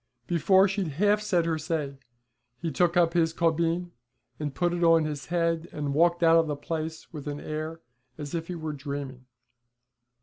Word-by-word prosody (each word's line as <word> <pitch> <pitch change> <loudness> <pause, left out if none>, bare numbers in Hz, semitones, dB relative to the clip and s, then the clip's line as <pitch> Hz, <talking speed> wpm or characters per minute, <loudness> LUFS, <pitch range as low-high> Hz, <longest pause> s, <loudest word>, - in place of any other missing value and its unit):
Before 190 +4 +4
she'd 195 -1 -2
half 205 +2 +3
said 185 -6 +1
her 160 -1 0
say 150 -3 -3 0.6
he 165 -1 -3
took 175 +5 +2
up 170 -1 +4
his 165 -2 +2
caubeen, 170 +1 0 0.6
put 175 +6 +1
it 175 0 -1
on 165 -1 +5
his 145 -4 -5
head, 170 -1 0
and 145 -2 -3
walked 170 +3 +3
out 165 0 +6
of 165 - +1
the 150 - -1
place 160 +3 -5
with 150 -2 -7
an 145 0 -4
air 155 +2 -5 0.4
as 145 -2 -7
if 165 -1 -3
he 180 - -4
were 155 -2 -4
dreaming. 140 -3 -6
165 Hz, 175 wpm, -27 LUFS, 150-175 Hz, 0.6 s, out